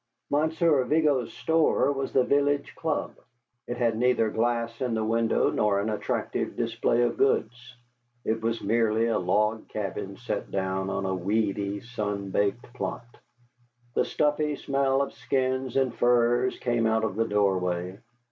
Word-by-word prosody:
Monsieur 155 Hz, -1 st, +2 dB
Vigo's 145 Hz, -3 st, +2 dB
store 160 Hz, -3 st, +2 dB
was 135 Hz, -1 st, -3 dB
the 130 Hz, -, +3 dB
village 145 Hz, +1 st, +1 dB
club. 160 Hz, -2 st, -2 dB, 0.5 s
It 120 Hz, -, -4 dB
had 115 Hz, -2 st, +1 dB
neither 115 Hz, -2 st, +2 dB
glass 115 Hz, 0 st, -1 dB
in 125 Hz, -3 st, 0 dB
the 110 Hz, -, 0 dB
window 115 Hz, 0 st, +2 dB
nor 105 Hz, -2 st, +2 dB
an 105 Hz, +2 st, -1 dB
attractive 105 Hz, -, -2 dB
display 120 Hz, +1 st, +1 dB
of 120 Hz, -, 0 dB
goods; 125 Hz, -1 st, 0 dB, 0.5 s
it 110 Hz, 0 st, 0 dB
was 115 Hz, 0 st, -2 dB
merely 115 Hz, +1 st, +2 dB
a 115 Hz, -, +1 dB
log 105 Hz, +4 st, 0 dB
cabin 100 Hz, -1 st, -5 dB
set 120 Hz, -4 st, -4 dB
down 95 Hz, 0 st, -2 dB
on 95 Hz, -, -2 dB
a 95 Hz, -, -1 dB
weedy, 100 Hz, +1 st, -1 dB
sun 105 Hz, -5 st, -4 dB
baked 105 Hz, +5 st, -1 dB
plot. 125 Hz, -1 st, -4 dB, 0.9 s
The -, -, +2 dB
stuffy 150 Hz, 0 st, 0 dB
smell 135 Hz, 0 st, +1 dB
of -, -, -6 dB
skins 130 Hz, +1 st, -1 dB
and 135 Hz, -2 st, +2 dB
furs 120 Hz, +1 st, +2 dB
came 120 Hz, -2 st, 0 dB
out 110 Hz, 0 st, +1 dB
of 110 Hz, -4 st, -1 dB
the 115 Hz, +1 st, 0 dB
doorway. 95 Hz, -2 st, 0 dB
115 Hz, 150 wpm, -27 LUFS, 105-130 Hz, 0.9 s, the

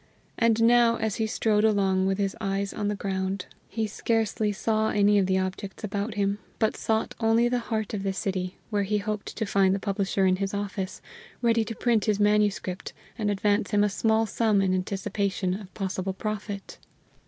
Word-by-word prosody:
And 230 Hz, -1 st, +3 dB
now, 235 Hz, 0 st, +5 dB
as 220 Hz, -3 st, -2 dB
he 220 Hz, -, 0 dB
strode 215 Hz, -2 st, +1 dB
along 195 Hz, -3 st, +3 dB
with 195 Hz, 0 st, +1 dB
his 195 Hz, -1 st, -1 dB
eyes 195 Hz, -1 st, -1 dB
on 205 Hz, -, -2 dB
the 210 Hz, -, 0 dB
ground, 190 Hz, -1 st, -2 dB, 0.2 s
he 220 Hz, +1 st, -1 dB
scarcely 220 Hz, 0 st, 0 dB
saw 220 Hz, +2 st, 0 dB
any 205 Hz, 0 st, +4 dB
of 190 Hz, -, +2 dB
the 190 Hz, 0 st, +2 dB
objects 190 Hz, +2 st, -4 dB
about 210 Hz, +1 st, -3 dB
him, 200 Hz, 0 st, 0 dB, 0.2 s
but 220 Hz, -, +1 dB
sought 220 Hz, 0 st, -1 dB
only 225 Hz, +1 st, +3 dB
the 245 Hz, 0 st, +1 dB
heart 220 Hz, -2 st, -2 dB
of 205 Hz, -, -2 dB
the 195 Hz, 0 st, -1 dB
City, 185 Hz, -1 st, -3 dB
where 205 Hz, -1 st, +1 dB
he 205 Hz, +1 st, 0 dB
hoped 210 Hz, 0 st, -4 dB
to 220 Hz, -, 0 dB
find 195 Hz, -1 st, +3 dB
the -, -, -2 dB
publisher 195 Hz, -1 st, 0 dB
in 185 Hz, 0 st, +3 dB
his 195 Hz, +1 st, -2 dB
office, 200 Hz, -1 st, -4 dB, 0.4 s
ready 230 Hz, -1 st, +3 dB
to 225 Hz, +1 st, -6 dB
print 230 Hz, -4 st, +1 dB
his 210 Hz, -2 st, +1 dB
manuscript, 205 Hz, -3 st, +1 dB, 0.2 s
and 215 Hz, -3 st, -1 dB
advance 205 Hz, 0 st, +1 dB
him 205 Hz, -1 st, +3 dB
a 210 Hz, -, +3 dB
small 220 Hz, +2 st, +2 dB
sum 220 Hz, -2 st, +2 dB
in 190 Hz, -1 st, +2 dB
anticipation 195 Hz, 0 st, -1 dB
of 190 Hz, -1 st, -7 dB
possible 190 Hz, -1 st, -2 dB
profit. 205 Hz, -1 st, -5 dB
205 Hz, 190 wpm, -27 LUFS, 195-220 Hz, 0.4 s, now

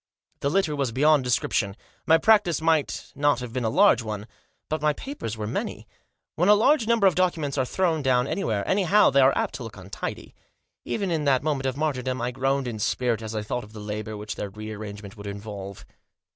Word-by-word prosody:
The 140 Hz, -, 0 dB
litter 160 Hz, -2 st, +1 dB
was 140 Hz, -4 st, -1 dB
beyond 145 Hz, +3 st, +4 dB
description. 115 Hz, -4 st, 0 dB, 0.3 s
My 160 Hz, -, +7 dB
practice 200 Hz, -4 st, +4 dB
might 160 Hz, -2 st, 0 dB
not 145 Hz, 0 st, +2 dB
have 125 Hz, -2 st, -7 dB
been 130 Hz, -1 st, -2 dB
a 110 Hz, -, +1 dB
large 115 Hz, +1 st, +5 dB
one, 105 Hz, -2 st, -5 dB, 0.4 s
but 155 Hz, 0 st, -2 dB
my 150 Hz, 0 st, +2 dB
papers 145 Hz, -, -6 dB
were 110 Hz, -, -3 dB
many. 105 Hz, -, -4 dB, 0.5 s
When 175 Hz, +6 st, +2 dB
a 210 Hz, -, +8 dB
large 235 Hz, +2 st, +3 dB
number 230 Hz, -3 st, +3 dB
of 190 Hz, -, +6 dB
documents 165 Hz, -6 st, 0 dB
are 130 Hz, -2 st, +1 dB
thrown 165 Hz, +1 st, 0 dB
down 125 Hz, -2 st, +2 dB
anywhere, 110 Hz, -, -2 dB
anyhow, 200 Hz, 0 st, +4 dB
they 140 Hz, +1 st, +5 dB
are 135 Hz, +1 st, +4 dB
apt -, -, -1 dB
to 125 Hz, -, -6 dB
look 115 Hz, -3 st, -9 dB
untidy. 95 Hz, +1 st, -6 dB, 0.5 s
Even 200 Hz, -4 st, -2 dB
in 155 Hz, -3 st, 0 dB
that 135 Hz, -2 st, +3 dB
moment 140 Hz, -3 st, -1 dB
of 130 Hz, 0 st, -2 dB
martyrdom 130 Hz, -4 st, -1 dB
I 120 Hz, +1 st, -1 dB
groaned 135 Hz, +1 st, 0 dB
in 110 Hz, -3 st, -5 dB
spirit 115 Hz, +1 st, 0 dB
as 110 Hz, 0 st, -6 dB
I 105 Hz, -, -2 dB
thought 120 Hz, +3 st, -3 dB
of 105 Hz, +1 st, -14 dB
the 110 Hz, -, -9 dB
labour 105 Hz, +1 st, -5 dB
which 105 Hz, 0 st, -5 dB
their 105 Hz, -, -4 dB
rearrangement 105 Hz, 0 st, -8 dB
would 100 Hz, 0 st, -8 dB
involve. 100 Hz, -1 st, -7 dB
130 Hz, 210 wpm, -25 LUFS, 110-155 Hz, 0.5 s, a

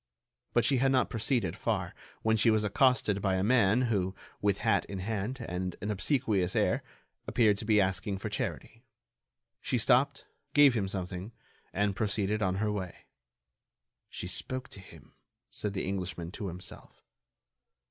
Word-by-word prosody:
But 120 Hz, -, +3 dB
she 135 Hz, -, +3 dB
had 135 Hz, +2 st, +3 dB
not 130 Hz, -, +2 dB
proceeded 115 Hz, -, 0 dB
far, -, -, -2 dB, 0.3 s
when 110 Hz, 0 st, +3 dB
she 110 Hz, +1 st, +4 dB
was 110 Hz, -1 st, +3 dB
accosted 105 Hz, -2 st, +2 dB
by 95 Hz, -1 st, +1 dB
a 95 Hz, -, 0 dB
man 115 Hz, +1 st, +4 dB
who, 100 Hz, -5 st, 0 dB, 0.3 s
with 100 Hz, -1 st, +2 dB
hat -, -, +3 dB
in 100 Hz, -, -6 dB
hand 110 Hz, +5 st, -3 dB
and 90 Hz, 0 st, -3 dB
an 105 Hz, +2 st, -3 dB
obsequious 105 Hz, -, +1 dB
air, -, -, +2 dB, 0.5 s
appeared 105 Hz, -4 st, +3 dB
to -, -, -4 dB
be 105 Hz, -1 st, +4 dB
asking 95 Hz, +1 st, 0 dB
for 95 Hz, -, -5 dB
charity. 115 Hz, +2 st, -4 dB, 0.8 s
She 125 Hz, -, 0 dB
stopped, 135 Hz, +4 st, +2 dB, 0.3 s
gave 145 Hz, -3 st, +7 dB
him 105 Hz, -5 st, 0 dB
something, 95 Hz, +2 st, -5 dB, 0.4 s
and 100 Hz, 0 st, 0 dB
proceeded 105 Hz, 0 st, -1 dB
on 95 Hz, -2 st, +1 dB
her 105 Hz, +2 st, 0 dB
way. 95 Hz, -4 st, -5 dB, 1.0 s
"She -, -, -6 dB
spoke 130 Hz, 0 st, -3 dB
to -, -, -11 dB
him," 80 Hz, -6 st, -15 dB, 0.4 s
said 105 Hz, -2 st, -3 dB
the 95 Hz, -, -2 dB
Englishman 90 Hz, -3 st, -4 dB
to 100 Hz, +1 st, -5 dB
himself. 90 Hz, +1 st, -8 dB
105 Hz, 160 wpm, -30 LUFS, 95-115 Hz, 1.0 s, gave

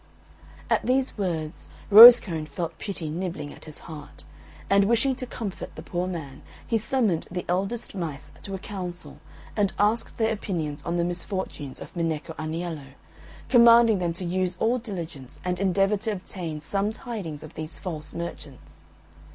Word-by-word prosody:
At -, -, +2 dB
these 260 Hz, +1 st, +1 dB
words 165 Hz, -5 st, -3 dB, 0.2 s
Rosecone 210 Hz, -8 st, +10 dB
felt 165 Hz, +3 st, -5 dB
pity 190 Hz, -6 st, -4 dB
nibbling 160 Hz, -2 st, -4 dB
at -, -, -12 dB
his 155 Hz, -2 st, -9 dB
heart, 150 Hz, -3 st, -11 dB, 0.4 s
and, 200 Hz, 0 st, +4 dB
wishing 235 Hz, +5 st, +2 dB
to 255 Hz, -2 st, -5 dB
comfort 215 Hz, -6 st, -6 dB
the -, -, -8 dB
poor 175 Hz, +1 st, -2 dB
man, 160 Hz, -7 st, -6 dB, 0.2 s
he 225 Hz, -, +1 dB
summoned 215 Hz, -7 st, 0 dB
the 180 Hz, 0 st, -4 dB
eldest 195 Hz, +6 st, -2 dB
mice 165 Hz, -7 st, -5 dB
to 195 Hz, -, -5 dB
a -, -, -3 dB
council, 180 Hz, -2 st, -7 dB, 0.4 s
and 205 Hz, -3 st, +1 dB
asked 215 Hz, +3 st, +1 dB
their 220 Hz, -1 st, +2 dB
opinions 165 Hz, -8 st, -3 dB
on 170 Hz, -, -3 dB
the 170 Hz, -, +1 dB
misfortunes 175 Hz, -5 st, -4 dB
of -, -, -10 dB
Minecco 165 Hz, -1 st, -2 dB
Aniello, 155 Hz, -3 st, -5 dB, 0.5 s
commanding 235 Hz, -3 st, +7 dB
them 170 Hz, -2 st, -1 dB
to 180 Hz, +2 st, -5 dB
use 180 Hz, +1 st, -1 dB
all 240 Hz, +3 st, +2 dB
diligence 170 Hz, -, -7 dB
and 180 Hz, -1 st, -1 dB
endeavour 195 Hz, +2 st, +2 dB
to 215 Hz, +2 st, -2 dB
obtain 175 Hz, -5 st, -5 dB
some 200 Hz, +6 st, -1 dB
tidings 205 Hz, -, -6 dB
of 155 Hz, -, -11 dB
these 155 Hz, +1 st, -6 dB
false 155 Hz, -5 st, -5 dB
merchants. 155 Hz, -5 st, -8 dB
180 Hz, 160 wpm, -26 LUFS, 160-210 Hz, 0.5 s, Rosecone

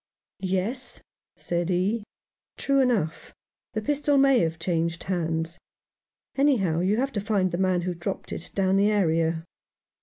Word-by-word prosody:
"Yes," 205 Hz, +8 st, -2 dB, 0.3 s
said 175 Hz, 0 st, -2 dB
he, 195 Hz, +5 st, +1 dB, 0.5 s
"true 275 Hz, 0 st, +2 dB
enough. 225 Hz, -12 st, 0 dB, 0.4 s
The 215 Hz, -1 st, -2 dB
pistol 290 Hz, +2 st, +2 dB
may 275 Hz, -2 st, +5 dB
have 165 Hz, -3 st, 0 dB
changed 165 Hz, 0 st, -1 dB
hands. 165 Hz, -2 st, -2 dB, 0.8 s
Anyhow, 225 Hz, -, +2 dB
you 190 Hz, +4 st, +2 dB
have 270 Hz, +3 st, 0 dB
to 205 Hz, -, -2 dB
find 200 Hz, -3 st, +1 dB
the 170 Hz, -, -2 dB
man 185 Hz, -2 st, +2 dB
who 180 Hz, 0 st, -1 dB
dropped 175 Hz, +3 st, -5 dB
it 170 Hz, -, -4 dB
down 195 Hz, -1 st, +2 dB
the 200 Hz, +1 st, +4 dB
area." 165 Hz, -5 st, +1 dB
190 Hz, 145 wpm, -26 LUFS, 170-225 Hz, 0.8 s, may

